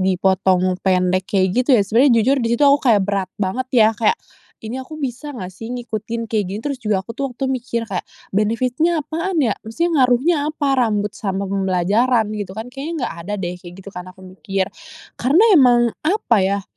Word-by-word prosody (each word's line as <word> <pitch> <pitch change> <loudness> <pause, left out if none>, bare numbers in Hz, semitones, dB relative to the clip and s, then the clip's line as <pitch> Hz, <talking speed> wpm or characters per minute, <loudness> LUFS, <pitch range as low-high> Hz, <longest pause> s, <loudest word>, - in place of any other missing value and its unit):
dipotong 185 0 +2
pendek 185 0 +2
kayak 190 -2 +1
gitu 260 0 +3
ya?" 205 - +4
Sebenernya 230 +2 +4
jujur 270 +4 +2
di 230 - 0
situ - - -1
aku 280 0 +6
kayak 205 -3 +4
berat 195 -2 -1
banget 210 +6 -2
ya, 220 -1 +7
kayak, 230 - +1 0.5
"Ini 250 +4 -4
aku 310 +4 -10
bisa 280 +1 -5
nggak 185 -3 -7
sih 225 +4 -9
ngikutin 230 -1 -4
kayak 210 -3 +1
gini." 205 +3 -5
Terus 280 -3 -3
juga 205 -4 -1
aku 230 - -7
tuh 275 +3 -3
waktu 270 +3 -4
tuh - - 0
mikir 235 -2 -3
kayak, 190 -4 -4 0.3
"benefit-nya 255 - 0
apaan 335 +3 -3
ya? 220 - +2 0.2
Maksudnya 335 +10 -1
ngaruhnya 255 +8 +2
apa 305 -2 -2
rambut 210 -3 0
sama 195 -1 -3
pembelajaran?" 200 +5 +1
gitu 200 -1 -6
kan. 235 +3 -7
"Kayaknya 290 +5 -5
nggak - - -4
ada 205 - -2
deh," 180 -2 -4
kayak 175 0 -11
gitu 200 - -8
kan 180 0 -8
aku 185 +1 -16
mikir. 190 +1 -3 0.5
Karena 295 - +4
emang 240 -5 +5
apa 325 - +1
yah 195 +1 0
220 Hz, 195 wpm, -20 LUFS, 190-255 Hz, 0.5 s, ya